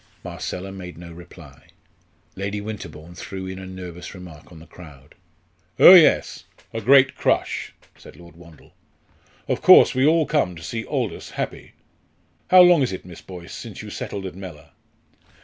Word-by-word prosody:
Marcella 95 +2 -6
made 90 -3 -10
no 85 0 -11
reply. 85 -5 -15 0.7
Lady 100 +2 -4
Winterbourne 85 -6 -9
threw 95 +1 -8
in 95 0 -7
a 95 - -9
nervous 90 -1 -9
remark 90 -4 -13
on 85 - -13
the 80 - -14
crowd. 75 -4 -16 0.6
"Oh, - - +9
yes, 175 -4 +4 0.3
a - - -4
great 135 +3 +5
crush," - - -2 0.2
said - - -16
Lord 85 -1 -16
Wandle. 85 -3 -18 0.7
"Of - - -2
course, - - +7
we 130 - 0
all 160 0 +3
come 140 - -1
to 80 - -12
see 110 +8 -5
Aldous - - -4
happy. - - -6 0.8
How 180 0 +8
long 175 -3 +5
is 130 - 0
it, 95 - -8
Miss 90 -2 -12
Boyce, 90 -2 -11
since - - -9
you - - -9
settled 100 -1 -6
at 95 - -6
Mellor?" 90 -6 -11
90 Hz, 165 wpm, -22 LUFS, 85-105 Hz, 0.8 s, Oh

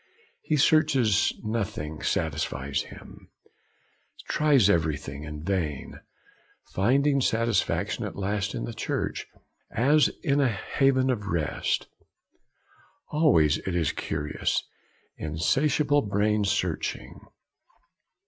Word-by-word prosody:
He 155 - 0
searches, 135 - +3
nothing 100 -9 -3
satisfies 70 -3 -1
him, - - -13 1.0
tries 145 -9 +4
everything, 75 -5 -1
in 75 0 -7
vain; 80 -7 -3 0.7
finding 135 +7 +2
satisfaction 115 -3 0
at - - -6
last 100 0 -2
in - - -3
the 120 - -5
Church, 110 - -3 0.4
as 145 +6 +4 0.2
in 140 0 +2
a 135 - +3
haven 130 +4 +1
of 105 -5 -3
rest. 80 -6 -1 1.2
Always 80 - +3
it 95 - -4
is 80 -5 +1
the - - -5
curious, 75 0 -2 0.5
insatiable 140 - +1
brain 105 0 +1
searching. 90 -4 -2
105 Hz, 100 wpm, -26 LUFS, 80-135 Hz, 1.2 s, tries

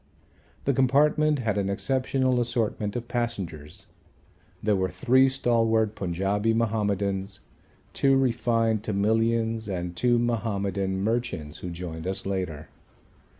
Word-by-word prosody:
The 140 - +2
compartment 145 +4 +3
had 110 -5 -1
an 100 -1 -1
exceptional 130 +3 +1
assortment 115 -3 -1
of 120 -1 -4
passengers. 95 -12 -4 0.8
There 105 -1 +2
were 95 -1 0
three 130 +3 +3
stalwart 115 -4 +1
Punjabi 100 +4 0
Mahomedans, 100 -3 -1 0.5
two 135 -1 +3
refined 115 -4 +1
Tamilians 110 +2 0
and 90 -2 -4
two 120 +5 +2
Mahomedan 100 -5 -1
merchants 110 -10 -2
who 90 - -6
joined 85 -1 -6
us 95 - -3
later. 90 -6 -3
110 Hz, 110 wpm, -26 LUFS, 95-120 Hz, 0.8 s, compartment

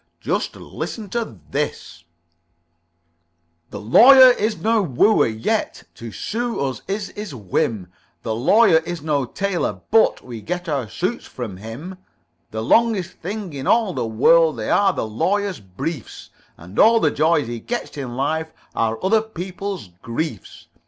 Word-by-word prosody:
"Just - - -2
listen 215 -4 -7
to 230 - -4
this: 85 +5 -4 1.6
"The - - -7
Lawyer 255 - +8
is 215 -2 -1
no 225 0 +2
wooer, 195 - +3
yet 110 0 -2
To 115 -1 -9
sue 235 - -3
us 130 -3 -2
is 200 0 -3
his 205 -8 -7
whim. 105 -1 -1 0.4
The 115 - -2
Lawyer 165 - +5
is 165 0 -4
no 145 -4 0
tailor, 195 +7 -2
but 225 0 +3
We 120 -3 -8
get 180 - -4
our 140 -8 -2
suits 185 - -3
from 110 -7 -7
him. 135 - -8 0.5
The 110 0 -4
longest 205 - +2
things 190 -3 -5
in 135 -1 -5
all 225 -5 +3
the 115 - -2
world 155 +7 +4
They 110 - -3
are 200 -1 +4
the 175 - -3
Lawyer's 195 - -1
briefs, 105 - -7 0.3
And 90 +5 -8
all 230 +1 +6
the 155 -8 +2
joys 160 -1 +2
he 120 0 -5
gets 240 - -5
in 130 -4 -5
life 160 +4 -1 0.2
Are 115 0 0
other 215 +3 +4
people's 190 - -6
griefs. 115 - -5
160 Hz, 150 wpm, -21 LUFS, -, 1.6 s, Lawyer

